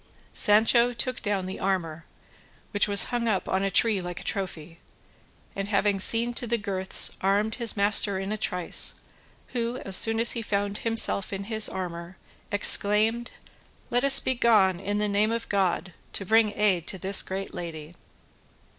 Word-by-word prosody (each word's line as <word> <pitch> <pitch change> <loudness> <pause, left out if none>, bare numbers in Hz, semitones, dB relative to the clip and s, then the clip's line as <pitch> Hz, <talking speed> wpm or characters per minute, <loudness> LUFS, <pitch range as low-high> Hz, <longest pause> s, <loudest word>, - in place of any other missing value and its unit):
Sancho 230 +3 +3
took 255 +2 -3
down 205 -4 -2
the 185 - -7
armour, 170 -4 -3 0.7
which 205 -1 +1
was 200 -1 +3
hung 240 -1 -1
up 205 -4 -1
on 190 - -1
a 195 - -1
tree 205 0 +2
like 175 -1 -7
a - - -10
trophy, 170 -4 -5 0.8
and 195 0 -4
having 200 -1 0
seen 235 +5 +4
to 240 - -5
the 235 +1 0
girths 190 -3 -1
armed 205 +3 0
his 230 -2 0
master 200 -1 +2
in 195 +1 -5
a - - -1
trice, 180 -3 +2 0.5
who 240 0 -3
as 195 - +1
soon 225 +3 +4
as 235 - +3
he 235 - -3
found 205 -1 -3
himself 225 -4 +1
in 195 0 -5
his 220 +1 -1
armour 175 -1 -7 0.3
exclaimed: 215 +3 +3 0.6
"Let 245 +2 0
us 275 -1 +5
be 260 - -1
gone 210 -7 +2
in 205 +2 -3
the 210 0 -1
name 205 +2 0
of 230 0 -4
God 190 -2 -1 0.2
to 195 - -5
bring 220 +1 +2
aid 190 -5 0
to - - -5
this 190 +2 +2
great 195 +1 -7
lady." 160 -2 -8
205 Hz, 170 wpm, -25 LUFS, 190-225 Hz, 0.8 s, us